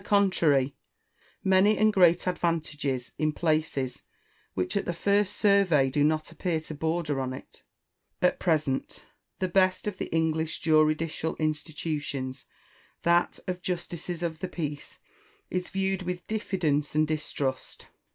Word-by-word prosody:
contrary, 170 Hz, -10 st, +3 dB, 0.7 s
many 190 Hz, +3 st, +4 dB
and 215 Hz, 0 st, +4 dB
great 175 Hz, -3 st, +5 dB
advantages 155 Hz, -7 st, -1 dB
in 155 Hz, 0 st, +2 dB
places 155 Hz, -5 st, -1 dB, 0.5 s
which 90 Hz, -1 st, -1 dB
at 200 Hz, -, 0 dB
the 175 Hz, -, -2 dB
first 200 Hz, +2 st, +2 dB
survey 190 Hz, -, +4 dB
do 145 Hz, +2 st, +2 dB
not 155 Hz, +1 st, +1 dB
appear 165 Hz, -1 st, -1 dB
to 155 Hz, 0 st, -8 dB
border 160 Hz, -2 st, -1 dB
on 130 Hz, 0 st, -3 dB
it, -, -, -11 dB, 0.6 s
At 180 Hz, -, +2 dB
present, 155 Hz, -6 st, 0 dB, 0.3 s
the 185 Hz, -, 0 dB
best 185 Hz, 0 st, +2 dB
of 210 Hz, -3 st, -4 dB
the -, -, -2 dB
English 160 Hz, -1 st, 0 dB
juridical 155 Hz, +1 st, +2 dB
institutions, 150 Hz, -4 st, -3 dB, 0.6 s
that 170 Hz, +1 st, +3 dB
of 180 Hz, -1 st, -3 dB
justices 175 Hz, -1 st, -4 dB
of 160 Hz, -2 st, -3 dB
the 185 Hz, -, -3 dB
peace, 150 Hz, -5 st, -5 dB, 0.5 s
is 180 Hz, 0 st, -2 dB
viewed 190 Hz, 0 st, -1 dB
with 180 Hz, 0 st, -4 dB
diffidence 165 Hz, -9 st, -1 dB
and 155 Hz, 0 st, +3 dB
distrust. 145 Hz, -4 st, -3 dB
160 Hz, 130 wpm, -28 LUFS, 150-180 Hz, 0.7 s, great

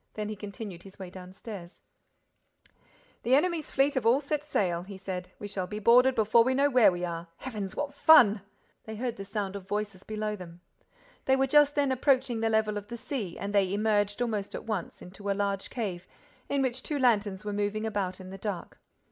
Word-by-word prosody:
Then 210 Hz, -1 st, -3 dB
he 215 Hz, -, -4 dB
continued 200 Hz, -3 st, -8 dB
his 195 Hz, +1 st, -14 dB
way 185 Hz, -2 st, -8 dB
downstairs: 185 Hz, 0 st, -10 dB, 1.4 s
"The 250 Hz, +3 st, +4 dB
enemy's 330 Hz, +1 st, +1 dB
fleet 275 Hz, +1 st, +3 dB
have 260 Hz, -, 0 dB
set -, -, -11 dB
all 255 Hz, +4 st, +4 dB
sail," 280 Hz, -, -1 dB
he 190 Hz, +2 st, -9 dB
said. 185 Hz, -1 st, -5 dB
"We 205 Hz, -, -6 dB
shall 190 Hz, -2 st, -3 dB
be 210 Hz, -, -5 dB
boarded 250 Hz, +4 st, +5 dB
before 220 Hz, +1 st, +5 dB
we 260 Hz, +2 st, +1 dB
know 285 Hz, +1 st, +3 dB
where 250 Hz, -6 st, +6 dB
we 175 Hz, 0 st, -3 dB
are. 170 Hz, 0 st, -5 dB
Heavens, 210 Hz, -7 st, -5 dB
what 290 Hz, -1 st, -3 dB
fun!" 230 Hz, -9 st, +6 dB, 0.4 s
They 220 Hz, -, -6 dB
heard 240 Hz, +1 st, -3 dB
the 195 Hz, -, -5 dB
sound 200 Hz, -1 st, -3 dB
of 195 Hz, -2 st, -8 dB
voices 205 Hz, -2 st, -3 dB
below 215 Hz, 0 st, -3 dB
them. 175 Hz, -3 st, -11 dB, 0.6 s
They 265 Hz, -, +4 dB
were 265 Hz, 0 st, +3 dB
just 290 Hz, +1 st, +5 dB
then 285 Hz, -2 st, +2 dB
approaching 260 Hz, -2 st, +2 dB
the 225 Hz, 0 st, +1 dB
level 215 Hz, -1 st, +1 dB
of 205 Hz, -, -15 dB
the 235 Hz, +2 st, -6 dB
sea 225 Hz, -8 st, -4 dB
and 200 Hz, +1 st, -4 dB
they 195 Hz, -2 st, +3 dB
emerged, 205 Hz, +1 st, +1 dB
almost 210 Hz, -4 st, -3 dB
at -, -, -6 dB
once, 215 Hz, -6 st, -4 dB
into 195 Hz, +3 st, -7 dB
a -, -, +3 dB
large 200 Hz, -1 st, -1 dB
cave 190 Hz, -7 st, -4 dB, 0.4 s
into 280 Hz, -1 st, +1 dB
which 255 Hz, 0 st, -1 dB
two 300 Hz, -, -3 dB
lanterns 210 Hz, -6 st, +2 dB
were 205 Hz, -, -2 dB
moving 205 Hz, +1 st, -1 dB
about 195 Hz, -4 st, -2 dB
in 185 Hz, 0 st, -9 dB
the 195 Hz, -, -8 dB
dark. 200 Hz, -3 st, -5 dB
210 Hz, 205 wpm, -29 LUFS, 195-250 Hz, 1.4 s, where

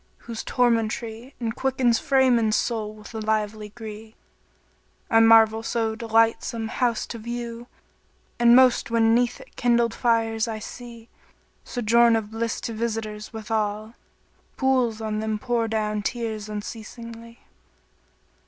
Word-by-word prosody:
whose 230 Hz, -2 st, -5 dB
tormentry 230 Hz, 0 st, -1 dB
* -, -, -40 dB
Enquickens 240 Hz, +1 st, +1 dB
frame 265 Hz, -3 st, +3 dB
and 220 Hz, -1 st, +1 dB
soul 220 Hz, -3 st, -1 dB
with 215 Hz, +1 st, -13 dB
lively 215 Hz, -1 st, -2 dB
gree: 220 Hz, 0 st, -10 dB, 1.0 s
I 225 Hz, -, +6 dB
marvel 225 Hz, -1 st, +6 dB
so 225 Hz, -1 st, -1 dB
delightsome 225 Hz, 0 st, +1 dB
house 240 Hz, -2 st, 0 dB
to 235 Hz, -, -7 dB
view, 235 Hz, +1 st, -6 dB, 0.3 s
* -, -, -39 dB
And 240 Hz, 0 st, +6 dB
most 255 Hz, -2 st, +5 dB
when 225 Hz, -1 st, +3 dB
'neath 240 Hz, 0 st, +1 dB
it -, -, -16 dB
kindled 235 Hz, -1 st, +2 dB
fires 225 Hz, -2 st, +1 dB
I 225 Hz, -1 st, -3 dB
see: 235 Hz, +1 st, -10 dB, 0.6 s
Sojourn 235 Hz, 0 st, +3 dB
of 220 Hz, -1 st, -3 dB
bliss 225 Hz, 0 st, -2 dB
to 230 Hz, -, -4 dB
visitors, 215 Hz, -2 st, -4 dB
withal 215 Hz, -1 st, -3 dB, 0.3 s
* -, -, -38 dB
Pools 255 Hz, -4 st, +1 dB
on 215 Hz, -1 st, -2 dB
them 220 Hz, 0 st, -2 dB
pour 235 Hz, 0 st, -1 dB
down 215 Hz, -1 st, -1 dB
tears 220 Hz, -1 st, -4 dB
unceasingly." 230 Hz, +2 st, -8 dB
225 Hz, 135 wpm, -24 LUFS, 220-235 Hz, 1.0 s, I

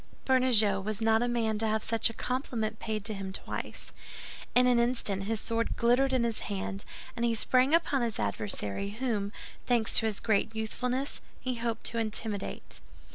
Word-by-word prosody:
Bernajoux 235 Hz, -7 st, +5 dB
was 210 Hz, +1 st, -3 dB
not 225 Hz, 0 st, +3 dB
a 245 Hz, -, +1 dB
man 225 Hz, -3 st, 0 dB
to 225 Hz, -, +1 dB
have 220 Hz, 0 st, 0 dB
such 230 Hz, +1 st, +3 dB
a -, -, -7 dB
compliment 225 Hz, -4 st, -2 dB
paid 215 Hz, -2 st, -3 dB
to 220 Hz, -, -1 dB
him 195 Hz, -1 st, -5 dB
twice. -, -, -6 dB, 0.6 s
In 250 Hz, +1 st, +6 dB
an 245 Hz, -1 st, +4 dB
instant 230 Hz, -5 st, +1 dB
his 220 Hz, +1 st, -1 dB
sword 230 Hz, +1 st, -1 dB
glittered 250 Hz, +3 st, +3 dB
in 255 Hz, -2 st, +2 dB
his 230 Hz, -2 st, -1 dB
hand, 195 Hz, 0 st, -4 dB, 0.3 s
and 235 Hz, -, -2 dB
he 235 Hz, -1 st, +2 dB
sprang 255 Hz, +6 st, +4 dB
upon 305 Hz, -5 st, +1 dB
his 230 Hz, -2 st, -1 dB
adversary, 105 Hz, -, -2 dB
whom, 215 Hz, -6 st, -1 dB, 0.4 s
thanks 235 Hz, -3 st, +3 dB
to 225 Hz, -, 0 dB
his 210 Hz, -2 st, -1 dB
great 220 Hz, 0 st, +1 dB
youthfulness, 250 Hz, +5 st, -2 dB, 0.2 s
he 255 Hz, 0 st, -2 dB
hoped 230 Hz, -2 st, -3 dB
to 230 Hz, -, 0 dB
intimidate. 215 Hz, -2 st, -3 dB
225 Hz, 180 wpm, -30 LUFS, 210-245 Hz, 0.6 s, In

